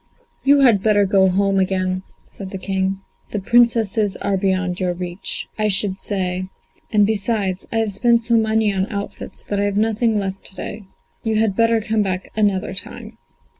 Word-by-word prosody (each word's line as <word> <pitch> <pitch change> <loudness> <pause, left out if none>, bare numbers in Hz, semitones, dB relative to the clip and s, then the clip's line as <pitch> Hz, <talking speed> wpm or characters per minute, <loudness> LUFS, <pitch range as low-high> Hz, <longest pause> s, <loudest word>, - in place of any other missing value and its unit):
"You 280 0 +5
had 230 -7 +5
better 205 -1 +3
go 190 0 +4
home 195 +1 +2
again," 185 -1 0 0.2
said 195 -2 -9
the 190 - -5
King, 190 0 -2 0.3
"the 210 - -2
Princesses 225 -2 +2
are 200 -1 -1
beyond 185 -2 0
your 180 -2 0
reach, 180 +1 -5
I 215 - +2
should 195 -1 -1
say; 185 -2 -2 0.4
and 210 -2 +4
besides, 200 -3 -1
I 225 - -1
have 220 -2 0
spent 235 +3 +3
so 235 - -1
much 225 - +5
money 220 -2 +2
on 190 0 0
outfits 200 -2 -6
that 205 - -2
I 200 - +2
have 205 0 -1
nothing 220 +1 +1
left 195 -1 -3
to 190 - -11
day. 210 +1 -7 0.4
You 225 -2 0
had 215 -2 +2
better 230 0 +3
come 220 0 0
back 185 -2 -3
another 200 -4 +1
time." 225 +3 -8
200 Hz, 185 wpm, -20 LUFS, 190-220 Hz, 0.4 s, You